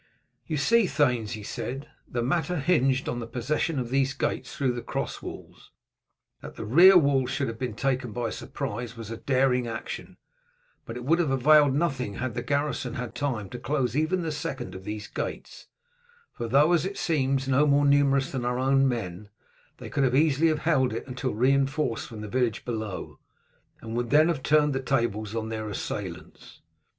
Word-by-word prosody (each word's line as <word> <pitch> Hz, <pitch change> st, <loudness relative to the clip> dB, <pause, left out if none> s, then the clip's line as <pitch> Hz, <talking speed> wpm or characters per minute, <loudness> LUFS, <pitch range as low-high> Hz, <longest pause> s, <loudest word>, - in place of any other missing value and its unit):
"You 155 Hz, -, -1 dB
see, 220 Hz, +9 st, +3 dB
thanes," 125 Hz, -10 st, +1 dB
he 105 Hz, -, -6 dB
said, 135 Hz, +6 st, -5 dB, 0.2 s
"the 120 Hz, -1 st, -2 dB
matter 175 Hz, +7 st, 0 dB
hinged 135 Hz, -4 st, +2 dB
on 120 Hz, -, -2 dB
the 115 Hz, -, -5 dB
possession 140 Hz, +6 st, -1 dB
of 125 Hz, -2 st, -3 dB
these 135 Hz, 0 st, +1 dB
gates -, -, -3 dB
through 135 Hz, -3 st, +1 dB
the 120 Hz, 0 st, -4 dB
cross -, -, -4 dB
walls. -, -, -10 dB, 0.7 s
That -, -, -9 dB
the -, -, -6 dB
rear 175 Hz, -, +8 dB
walls 140 Hz, -5 st, +3 dB
should 135 Hz, 0 st, -1 dB
have 115 Hz, 0 st, -6 dB
been 125 Hz, -4 st, -3 dB
taken 130 Hz, -1 st, -1 dB
by 115 Hz, 0 st, -2 dB
surprise 115 Hz, +2 st, -5 dB
was 115 Hz, -1 st, -7 dB
a 115 Hz, -, -5 dB
daring 130 Hz, -2 st, +1 dB
action, 115 Hz, 0 st, -6 dB, 0.7 s
but 115 Hz, -, -6 dB
it 125 Hz, -, -7 dB
would 165 Hz, +5 st, +3 dB
have 165 Hz, -5 st, +1 dB
availed 140 Hz, +1 st, +5 dB
nothing 135 Hz, -9 st, -1 dB
had 130 Hz, -2 st, -3 dB
the -, -, -3 dB
garrison 140 Hz, -4 st, -1 dB
had 125 Hz, -1 st, -5 dB
time 125 Hz, -8 st, -2 dB
to 125 Hz, -, -6 dB
close 130 Hz, -5 st, -1 dB
even 165 Hz, +4 st, +1 dB
the 160 Hz, -, -2 dB
second 145 Hz, -10 st, -5 dB
of 95 Hz, 0 st, -9 dB
these 105 Hz, 0 st, -5 dB
gates; -, -, -6 dB, 0.7 s
for 120 Hz, -, -4 dB
though, 140 Hz, +7 st, +4 dB
as 165 Hz, -3 st, +3 dB
it 195 Hz, +2 st, -4 dB
seems, 135 Hz, -6 st, 0 dB
no 135 Hz, +3 st, +3 dB
more 145 Hz, 0 st, +4 dB
numerous 140 Hz, -1 st, +3 dB
than 130 Hz, -2 st, -3 dB
our 125 Hz, +2 st, 0 dB
men, 110 Hz, -8 st, 0 dB, 0.5 s
they -, -, -9 dB
could 140 Hz, -, +1 dB
have 130 Hz, -1 st, +2 dB
easily 155 Hz, +1 st, +4 dB
held 135 Hz, -7 st, +1 dB
it 115 Hz, -, -4 dB
until 130 Hz, -2 st, -3 dB
reinforced 135 Hz, +1 st, +1 dB
from 110 Hz, -2 st, -9 dB
the 105 Hz, -, -6 dB
village 120 Hz, -1 st, -1 dB
below, 110 Hz, -5 st, -5 dB, 0.6 s
and 115 Hz, 0 st, -6 dB
would 120 Hz, 0 st, -1 dB
then 155 Hz, +4 st, +5 dB
have 155 Hz, -6 st, -1 dB
turned 150 Hz, +1 st, +3 dB
the 135 Hz, -, -1 dB
tables 115 Hz, -5 st, -1 dB
on 110 Hz, -1 st, -3 dB
their 110 Hz, -1 st, -4 dB
assailants. 105 Hz, -, -7 dB
130 Hz, 185 wpm, -27 LUFS, 115-145 Hz, 0.7 s, rear